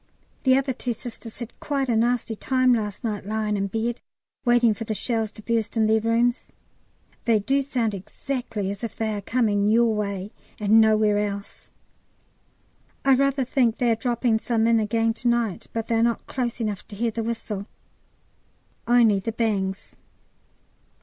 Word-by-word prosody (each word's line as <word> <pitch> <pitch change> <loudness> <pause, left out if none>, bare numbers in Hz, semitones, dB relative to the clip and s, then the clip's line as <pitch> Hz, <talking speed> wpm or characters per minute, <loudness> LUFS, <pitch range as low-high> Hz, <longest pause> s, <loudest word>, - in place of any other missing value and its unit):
The 260 0 +6
other 270 -1 0
two 245 -1 -3
Sisters 230 0 -9
had 235 -1 -9
quite 275 -2 -1
a 235 - +1
nasty 235 0 +1
time 255 +2 +2
last 210 -4 -2
night 215 -3 -2
lying 215 +1 -1
in 200 0 -1
bed, 225 +4 -2 0.4
waiting 240 -3 +4
for 220 - -6
the 220 -1 -3
shells 225 -1 -1
to 215 - -12
burst 230 0 -1
in 220 - +4
their 220 +1 +3
rooms. 230 +2 +1 0.8
They 230 -2 +4
do 270 +7 +1
sound 245 -5 -1
exactly 210 0 -4
as 200 +3 -8
if 230 - -4
they 220 -1 -1
are 205 - -3
coming 210 -2 +1
your 230 +1 +4
way 200 -1 -3 0.3
and 215 +1 +5
nowhere 215 -1 +3
else! 200 -1 -5 1.3
I 270 - +6
rather 275 0 +2
think 245 -3 +1
they 240 -2 +2
are - - +3
dropping 235 -1 0
some 225 -1 0
in 230 0 +4
again 225 +1 +1
to 240 - -3
night, 235 -5 0
but 225 -1 -3
they 230 - -2
are 225 - +3
not 235 0 +1
close 245 -2 -3
enough 210 -4 -3
to 205 - -10
hear 230 +2 0
the 230 - -3
whistle, 220 -3 -4 1.2
only 230 -4 +5
the 210 +4 -3
bangs. 200 -4 -2
225 Hz, 175 wpm, -24 LUFS, 210-240 Hz, 1.3 s, The